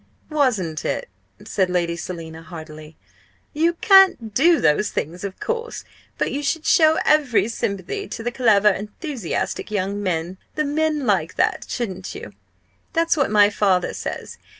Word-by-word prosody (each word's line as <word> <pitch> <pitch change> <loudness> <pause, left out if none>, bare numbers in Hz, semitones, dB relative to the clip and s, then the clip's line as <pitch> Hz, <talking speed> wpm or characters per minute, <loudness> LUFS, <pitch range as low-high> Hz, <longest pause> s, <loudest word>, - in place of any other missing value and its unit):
"Wasn't 215 - 0
it?" - - -3 0.4
said 190 -2 0
Lady 175 -2 0
Selina, 165 -2 -7
heartily. 155 -2 -11 0.6
"You 330 +3 +2
can't 385 - +5
do 330 +8 +4
those 150 +8 +2
things, 170 +5 -4
of 195 -2 -6
course! 465 0 -4 0.3
But - - -1
you 285 - -2
should 305 +3 -2
show 315 -3 +5
every 280 -8 +3
sympathy 235 - -3
to 225 - -6
the 240 - -2
clever 215 -5 +4
enthusiastic 210 - -4
young 200 0 -2
men 180 -1 -2 0.2
the 305 - 0
men 300 0 0
like 185 -7 +1
that - - 0
shouldn't 215 -7 -4
you? - - -9 0.6
That's 330 -1 +2
what 280 -4 +1
my 210 -1 +5
father 190 -3 +1
says. - - -6
210 Hz, 150 wpm, -22 LUFS, 180-305 Hz, 0.6 s, can't